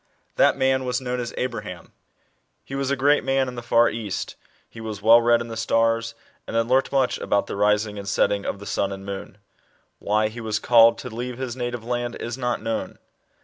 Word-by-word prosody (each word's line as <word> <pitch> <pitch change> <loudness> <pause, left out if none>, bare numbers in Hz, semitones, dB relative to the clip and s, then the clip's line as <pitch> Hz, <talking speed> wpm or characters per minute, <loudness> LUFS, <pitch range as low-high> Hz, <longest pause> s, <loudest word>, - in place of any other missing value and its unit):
That - - +4
man 130 0 +2
was 125 0 -1
known 125 -1 -3
as 120 -1 -4
Abraham. 125 -2 -5 0.7
He - - -11
was 135 -1 -1
a 140 - +2
great 145 +2 +3
man 135 0 +1
in 125 - -5
the 120 - -6
far 120 0 +4
East; 110 -4 -4 0.3
he 115 - -11
was 110 -2 -5
well 115 +2 +7
read 120 0 +3
in 120 - -5
the 115 - -6
stars, 115 0 +1 0.3
and - - -5
had 115 0 +2
learnt 130 +2 +2
much 135 -2 +1
about 100 - 0
the - - -6
rising 105 0 +1
and 100 0 -5
setting 100 0 +1
of - - -3
the 100 - -11
sun 100 -1 -1
and 95 0 -7
moon. 100 0 -7 0.6
Why 105 +1 +1
he 120 +2 -8
was 110 -2 -1
called 115 0 +5
to 125 - -7
leave 120 +2 -5
his 130 -2 -4
native 120 -2 -4
land 120 0 -2
is 120 0 -5
not 125 -3 -2
known. 115 0 -3
115 Hz, 215 wpm, -23 LUFS, 110-125 Hz, 0.7 s, well